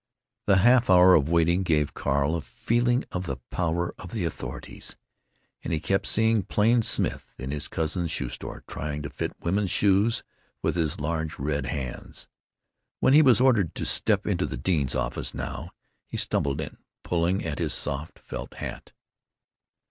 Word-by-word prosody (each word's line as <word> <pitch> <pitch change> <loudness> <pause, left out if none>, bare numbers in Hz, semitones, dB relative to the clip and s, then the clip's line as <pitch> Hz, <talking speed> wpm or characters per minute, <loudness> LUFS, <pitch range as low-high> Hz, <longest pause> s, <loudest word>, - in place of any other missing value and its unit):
The 100 - +5
half 120 +4 +5
hour 90 0 +7
of 75 -2 +4
waiting 85 +2 +3
gave 75 -5 +1
Carl 70 +3 0
a 85 - -2
feeling 120 - 0
of 90 -1 -4
the 65 - -3
power 85 0 -1
of 90 - -8
the 105 -6 -1
authorities. 80 - -6 0.7
And - - -4
he 80 - +1
kept 95 +5 0
seeing 110 0 +3
Plain 115 +5 +2
Smith - - +1
in 65 +1 -5
his 75 0 0
cousin's 80 +2 -2
shoe - - -2
store, - - -7
trying 75 0 -4
to 70 - -6
"fit" - - -3
women's 95 +3 0
shoes 100 +5 +3 0.4
with - - 0
his 80 -1 -1
large 80 +1 -2
red 70 -1 -2
hands. 65 -1 -6 0.7
When 130 - +4
he 150 - +8
was 130 -6 +6
ordered 120 - +3
to - - -3
"step - - +3
into - - 0
the 65 - -5
dean's 70 -2 0
office, 65 -1 -2
now," - - -5 0.4
he - - -5
stumbled 70 +2 0
in, 75 - -7 0.3
pulling 85 +2 0
at 80 -3 -3
his - - -1
soft 70 +3 -2
felt - - -8
hat. - - -7
85 Hz, 170 wpm, -26 LUFS, 75-100 Hz, 0.7 s, he